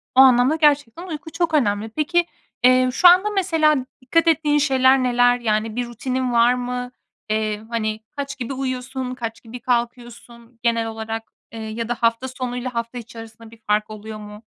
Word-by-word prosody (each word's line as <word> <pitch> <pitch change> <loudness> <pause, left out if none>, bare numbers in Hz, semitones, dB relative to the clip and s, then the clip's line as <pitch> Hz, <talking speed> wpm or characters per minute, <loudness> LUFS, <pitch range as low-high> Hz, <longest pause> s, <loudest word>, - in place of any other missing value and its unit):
o - - +5
anlamda 260 +3 +5
gerçekten 295 +1 +1
uyku 320 -1 -7
çok 335 -2 -1
önemli. 215 -6 +1
Peki, 340 +7 +1 0.4
eee, 255 0 +5
şu 360 - +6
anda 370 +4 +6
mesela 325 -6 +2 0.3
dikkat 330 +6 +1
ettiğin 305 -2 +3
şeyler 265 -2 +4
neler? 245 0 +3
Yani, 215 -1 -1
bir 245 0 -1
rutinin 250 +2 -3
var 235 +1 +5
mı? 250 0 -4 0.4
Eee, 215 -1 -1
hani, 215 -2 -2 0.2
kaç 280 -1 -5
gibi 250 +2 -4
uyuyorsun, 255 -1 -4
kaç 230 -2 -6
gibi 240 +2 -9
kalkıyorsun 235 -1 -4
genel 230 -1 +1
olarak, 225 0 -5 0.3
eee, 225 - -8
ya 220 +1 -5
da 240 - 0
hafta 230 +3 0
sonu 255 -1 -5
ile 250 +1 -4
hafta 235 0 -4
içerisinde 225 -1 -11
bir 230 - -15
fark 210 +1 +1
oluyor 215 0 -8
mu? 210 +1 -11
245 Hz, 175 wpm, -21 LUFS, 225-270 Hz, 0.4 s, şu